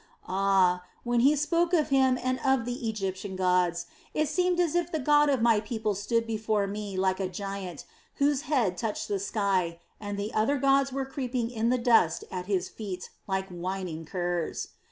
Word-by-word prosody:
Ah, 190 -2 +3 0.2
when 240 0 +1
he 275 +5 +5
spoke 335 +4 +1
of 315 -4 +3
Him 265 -2 +4
and 255 0 0
of 265 -3 +2
the 245 -1 -3
Egyptian 195 -2 -4
gods, 180 -2 +1 0.3
it 305 0 +2
seemed 360 +4 +1
as 345 -4 +2
if 350 0 0
the 320 - 0
God 295 +1 +4
of 265 -5 +2
my 230 -2 +5
people 215 -1 -2
stood 220 +4 0
before 215 -2 0
me 200 -1 -5
like 190 0 +1
a 190 -1 -1
giant, 195 -4 -6 0.3
whose 285 -1 +2
head 230 -12 +1
touched 220 -3 -2
the 200 -1 -1
sky, 190 -4 0 0.2
and 205 -1 -5
the 205 +2 -3
other 225 +7 +2
gods 275 0 +3
were 270 +1 -2
creeping 250 -3 -3
in 230 -1 0
the 255 - +3
dust 230 -9 +3
at 180 -1 -5
his 190 -3 0
feet 190 -4 -7 0.2
like 190 -1 -1
whining 180 -2 -4
curs. 175 -1 -2
215 Hz, 185 wpm, -28 LUFS, 190-265 Hz, 0.3 s, he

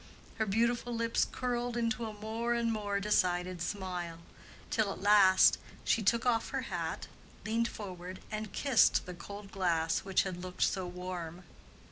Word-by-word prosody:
Her 220 - +1
beautiful 235 +3 +1
lips 230 0 +1
curled 245 -1 -2
into 230 -1 0
a 215 - -6
more 225 +3 -2
and 230 -1 +1
more 205 -2 -1
decided 180 -3 +1
smile, 180 -2 -3 0.5
till 215 -3 +1
at - - -7
last 200 -2 +6 0.2
she 230 - +2
took 230 +3 +2
off 230 -2 +2
her - - -2
hat, - - -3 0.4
leaned 230 +2 +1
forward 185 -4 -7
and 215 -1 -4
kissed 270 -5 +4
the 180 - -6
cold 200 +3 -9
glass 170 -4 +1
which 190 -1 +1
had 185 -2 -5
looked 180 0 -2
so 190 -2 0
warm. 180 -1 -6
205 Hz, 155 wpm, -32 LUFS, 185-230 Hz, 0.5 s, last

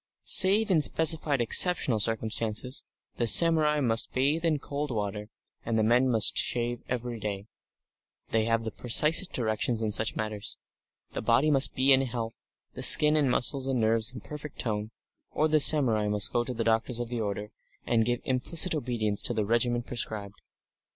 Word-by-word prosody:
Save 205 +3 +5
in 165 -4 +2
specified 155 -3 +2
exceptional 130 -1 +4
circumstances, 115 +3 -2 0.3
the 120 - -2
samurai 155 +2 +4
must 115 -3 -2
bathe 145 +6 -1
in 160 -3 0
cold 145 +1 -6
water, 105 -2 -6 0.3
and 115 -1 -3
the 110 - 0
men 120 +4 +1
must 110 -4 +1
shave 120 0 0
every 120 -2 -5
day; 100 -2 -6 0.8
they 110 -1 -1
have 115 0 -1
the 110 - -6
precisest 150 - 0
directions 110 0 -3
in 110 - -3
such 110 +1 -2
matters; 105 -1 -5 0.5
the - - -6
body 130 +7 +1
must 135 -1 +1
be 135 +1 +3
in 130 - +2
health, 120 -3 -6 0.4
the - - -9
skin 150 0 +8
and 145 -4 0
muscles 130 +2 -1
and 130 -2 -2
nerves 110 +1 0
in 125 - -11
perfect 150 -1 -11
tone, 105 -2 -4 0.4
or 155 - 0
the 155 0 +1
samurai 125 -9 +3
must 105 -4 +1
go 120 - 0
to 125 - -6
the - - -3
doctors 115 +2 -2
of 120 -1 -6
the 120 -2 -5
order, 105 0 -6 0.3
and 115 -1 0
give 120 +2 -3
implicit 160 +7 +1
obedience 120 -8 -4
to 120 - -3
the 110 -2 -2
regimen 120 +2 -1
prescribed. 105 -4 -5
120 Hz, 175 wpm, -26 LUFS, 110-140 Hz, 0.8 s, skin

